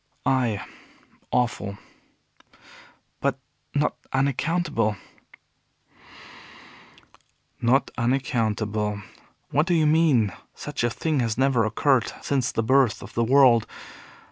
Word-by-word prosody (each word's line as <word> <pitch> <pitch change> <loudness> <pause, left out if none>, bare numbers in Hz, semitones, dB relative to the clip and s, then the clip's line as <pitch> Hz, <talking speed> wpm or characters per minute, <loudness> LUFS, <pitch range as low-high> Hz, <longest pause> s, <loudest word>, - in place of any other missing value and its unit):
"Ay, 125 -6 +1 0.7
awful." 110 -5 -1 1.4
"But - - 0 0.4
not 145 0 +1
unaccountable." 140 - 0 2.7
"Not 130 +3 +2
unaccountable! 110 -4 -1 0.5
What 150 +3 +2
do 175 - +2
you 160 -2 +3
mean? 150 - +3 0.2
Such - - -5
a 120 - +2
thing 155 +5 -1
has 115 -3 -1
never 130 -4 +2
occurred 120 +1 +1
since 135 -3 0
the 115 - -1
birth 130 -2 +2
of 105 - -11
the 115 - +1
world. 125 -2 +5
125 Hz, 95 wpm, -24 LUFS, 110-140 Hz, 2.7 s, world